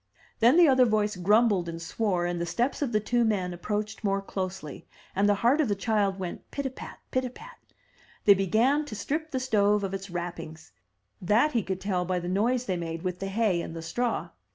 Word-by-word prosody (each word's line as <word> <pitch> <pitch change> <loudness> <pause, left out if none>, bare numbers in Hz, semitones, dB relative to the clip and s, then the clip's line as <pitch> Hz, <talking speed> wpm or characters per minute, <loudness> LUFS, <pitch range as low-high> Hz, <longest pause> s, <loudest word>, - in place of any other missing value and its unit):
'' - - -31
Then 240 +7 +5
the 350 -2 +7
other 260 -2 +5
voice 215 -2 +1
grumbled 200 -1 +3
and 165 0 -6
swore, 180 +1 -1
and 175 -1 -2
the - - 0
steps 245 - -1
of 275 -5 0
the 215 - +2
two 240 +3 +1
men 190 -5 0
approached 210 +5 -4
more 195 -1 +1
closely, 185 -6 -6 0.3
and 200 +1 +3
the 205 - +4
heart 275 +6 +5
of 290 - +1
the 205 - 0
child 200 -2 0
went 180 -2 -6
pit 280 - -4
a 265 - -1
pat, - - -10
pit 255 - +1
a 255 - -3
pat. - - -13 0.7
They 205 - +9
began 225 - +2
to 225 - -7
strip 310 +9 -3
the 260 - -2
stove 210 -5 +2
of 195 -1 -3
its 195 0 -5
wrappings; 170 -2 -6 0.5
that 215 - +3
he 235 - +1
could 190 -1 -4
tell 185 -2 0
by 180 +1 -1
the 175 0 -4
noise 235 +7 +1
they 185 -5 -1
made 165 0 -5
with 180 -1 -3
the 195 - -3
hay 195 -3 +1
and 165 - -7
the 165 - -6
straw. 240 +8 -2
205 Hz, 225 wpm, -27 LUFS, 180-235 Hz, 0.7 s, They